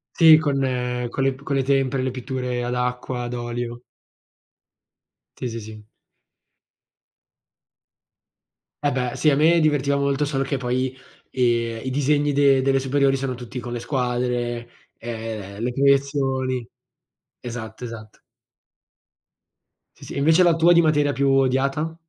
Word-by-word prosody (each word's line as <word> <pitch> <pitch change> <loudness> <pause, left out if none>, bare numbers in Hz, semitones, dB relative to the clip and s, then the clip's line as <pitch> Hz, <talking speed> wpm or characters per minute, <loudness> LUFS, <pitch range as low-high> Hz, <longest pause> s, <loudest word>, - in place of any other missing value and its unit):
Sì, 160 -2 +8
con 145 -3 0 0.5
con 135 - -3
le 135 - +2
p 130 +1 -14
con 140 0 -2
le 135 - +2
tempere, 135 -1 +1
le 130 - -1
pitture 125 -1 -4
ad 120 0 -2
acqua, 125 0 -2
ad 120 0 -5
olio. 120 0 -5 1.6
Sì, 125 - -3
sì, 115 0 -5
sì. 110 0 -11 3.0
Eh 145 - +3
beh, 125 -2 -2
sì, 155 - +3
a 140 - +2
me 165 +3 +4
divertiva 145 -2 +2
molto, 140 +1 0
solo 140 -2 -1
che 135 +1 -2
poi, 130 0 -1 0.4
ehm, 115 -2 0
i - - -1
disegni 145 +2 +1
de 140 -1 +4
delle 135 0 +2
superiori 135 +1 +2
sono 130 -1 -3
tutti 125 +1 -7
con 120 0 -7
le 120 - -3
squadre, 120 -2 -2 0.3
ehm, 110 -3 -6
le 125 +1 -1
proiezioni 135 -2 +1 0.7
Esatto, 115 -1 -7
esatto. 115 -3 -9 1.8
Sì, - - -14
sì. - - -8
Invece 160 +5 +4
la 170 -2 +4
tua 165 +1 +5
di 170 - +6
materia 145 -3 +2
più 140 +1 +1
odiata? 135 +4 +1
130 Hz, 140 wpm, -23 LUFS, 120-140 Hz, 3.0 s, Sì